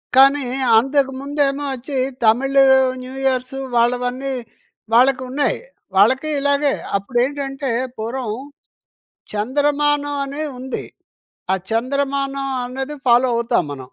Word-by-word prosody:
కానీ, 275 +2 +6 0.3
అంతకుముందేమో 275 +2 0
వచ్చి 265 +2 -5 0.3
Tamil 265 +5 +3 0.4
new 255 +1 -9
years 255 0 0 0.2
వాళ్ళవన్నీ 250 +3 +1 0.6
వాళ్ళకున్నాయి 255 +3 +2 0.4
వాళ్ళకీ 260 +10 +4
ఇలాగే. 285 0 +2 0.3
అప్పుడేంటంటే 270 +6 -2 0.3
పూర్వం 230 +1 -3 1.0
చంద్రమానం 290 +5 +1
అని 280 +2 -5 0.2
ఉంది. 260 +1 -5 0.7
ఆ - - +4 0.2
చంద్రమానం 275 +3 -1 0.2
అనేది 265 +4 -5
ఫాలో 245 +1 +5
అవుతాం 235 -4 +1
మనం. 135 -3 -8
265 Hz, 90 wpm, -20 LUFS, 245-280 Hz, 1.0 s, కానీ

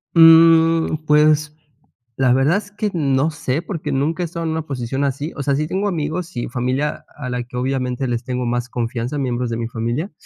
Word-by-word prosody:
Mm, 165 0 +6
pues, 150 0 +3 0.6
la 130 -2 +3
verdad 140 +8 +3
es 205 0 -7
que 210 0 -2
no 140 -2 +1
sé 150 0 -2
porque 165 -5 -5
nunca 155 +6 0
he - - 0
estado 165 0 -5
en 160 - -1
una 160 -1 -2
posición 135 0 -3
así. 140 +3 -2
O 140 - -4
sea, 140 0 +1
sí 155 +1 -1
tengo 195 +4 -1
amigos 170 0 -3
y 120 - -3
familia 130 +4 -2
a 135 -4 -6
la 125 0 -2
que 125 +1 -13
obviamente 130 0 -1
les 120 0 -2
tengo 125 0 -3
más 120 +1 -1
confianza, 120 +3 -3
a - - -2
miembros 125 -2 -1
de 115 - -2
mi 115 -1 -3
familia. 120 - -3
140 Hz, 210 wpm, -20 LUFS, 125-160 Hz, 0.6 s, Mm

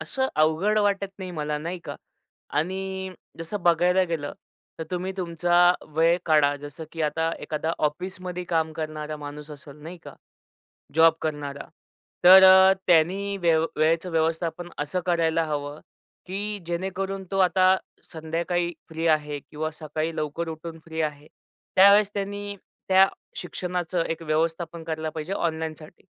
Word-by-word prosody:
असं 265 - -1
अवघड 160 +8 +3
वाटत 200 -1 +1
नाही 185 -1 -6
मला, 150 -2 -3
नाही 170 +4 -5
का? - - -6 0.6
आणि 190 +4 -2 0.3
जसं 170 +4 -5
बघायला 175 +2 +4
गेलं 160 -5 -3 0.5
तर 160 - -4
तुम्ही 185 +1 -3
तुमचा 175 0 +3 0.2
वेळ 165 +2 +4
काढा. 150 -2 +4
जसं 145 +2 -9
की 165 - -3
आता 160 +2 0
एखादा 160 +1 -2
ऑफिसमध्ये 180 +3 -3
काम 160 -2 0
करणारा 155 -1 -5
माणूस 150 +1 -9
असेल 145 -1 -11
नाही 170 +3 -9
का, - - -10 0.8
जॉब 165 0 +6
करणारा. 145 -2 -4 0.6
तर 190 +2 +10
अ, 190 0 +8
त्यांनी 190 +4 +3
वेव 165 -3 +3
वेळेचं 165 +3 +1
व्यवस्थापन 165 +1 -1
असं 150 +5 -2
करायला 165 -2 +2
हवं, 145 -1 -4 0.5
की 205 +3 -4
जेणेकरून 190 +3 -3
तो 195 - -1
आता 185 0 +5 0.4
संध्याकाळी 170 +2 -2 0.2
फ्री 165 +1 -2
आहे 150 -2 +1
किंवा 155 +2 -5
सकाळी 155 +1 -4
लवकर 155 +2 -3
उठून 160 +1 -8
फ्री 160 -1 -3
आहे. 150 -1 -4 0.5
त्यावेळेस 200 +2 +7
त्यांनी 205 0 -4 0.3
त्या 190 0 +7 0.3
शिक्षणाचं 180 -1 -3
एक 165 - -3
व्यवस्थापन 165 +1 -1
करायला 160 -1 -3
पाहिजे 160 +4 -4
ऑनलाईनसाठी. 160 -2 -4
165 Hz, 140 wpm, -25 LUFS, 155-185 Hz, 0.8 s, तर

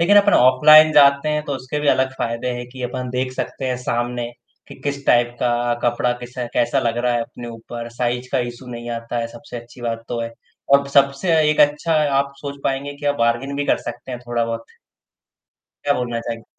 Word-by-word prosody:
लेकिन 195 +5 +5
अपन 205 0 +6
ऑफलाइन 155 +5 +7
जाते 140 0 +5
हैं 150 0 0
तो 145 - -3
उसके 130 +2 -4
भी 150 - 0
अलग 130 -1 +2
फ़ायदे 115 +1 -2
हैं 120 0 -6
कि 130 0 -9
अपन 125 0 -4
देख 130 +1 -2
सकते 130 +1 -4
हैं 125 -1 -1
सामने, 120 -1 -2 0.4
कि - - -10
किस 140 -1 -3
टाइप 120 0 +4
का 120 - +2 0.3
कपड़ा 120 0 +1
किस 120 +1 -9 0.2
कैसा 120 0 +2
लग 115 -1 -1
रहा 125 0 +1
है 120 - +1
अपने 120 +1 -9
ऊपर 115 +1 -8
साइज़ 120 +1 -2
का 135 - +2
इश्यू 120 +1 -13
नहीं 120 0 -6
आता 115 +1 -5
है 115 - -1
सबसे 120 +3 -10
अच्छी 120 +1 -11
बात 115 -1 -3
तो 120 - -2
है। 115 0 -4 0.4
और 140 0 +4
सबसे 140 +5 +3 0.2
एक 150 - +1
अच्छा 150 +3 +3 0.2
आप 140 0 -1
सोच 140 0 -7
पाएँगे 135 +1 -1
कि 145 - -4
आप 145 - +2
बारगेन 120 +4 0
भी 145 - -1
कर - - +2
सकते - - -8
हैं 125 - -4
थोड़ा-बहुत। 115 -1 -2 1.2
क्या 145 - +3
बोलना 120 -1 -2
चाहेंगे? 115 -1 -6
125 Hz, 210 wpm, -20 LUFS, 120-140 Hz, 1.2 s, ऑफलाइन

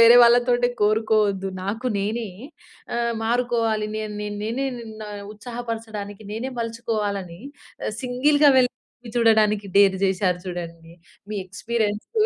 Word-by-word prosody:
వేరే 230 +1 +9
వాళ్ళతోటి 245 +1 +4
కోరుకోవద్దు, 210 -2 +2
నాకు 225 +6 -3
నేనే 220 +2 -2 0.7
ఆహ్, 235 0 0
మారుకోవాలి, 230 -3 +1
నేన్ 215 -1 -4 0.3
నేనే 245 +5 -1 0.3
న - - -5 0.3
ఉత్సాహపరచడానికి 220 -2 -6
నేనే 235 +5 -3
మలుచుకోవాలని 210 -6 -3 0.4
ఆహ్, - - -2
సింగిల్‌గా 285 +4 +4
వెళ్లి 250 -1 +4 0.4
చూడడానికి 215 -3 +3
డేర్ 200 -1 +6
జేశారు 185 -2 +2
జూడండి. 170 -2 -7 0.4
మీ 215 - -4
ఎక్స్‌పీరియన్స్‌లు 215 - -2
220 Hz, 110 wpm, -23 LUFS, 200-235 Hz, 0.7 s, వేరే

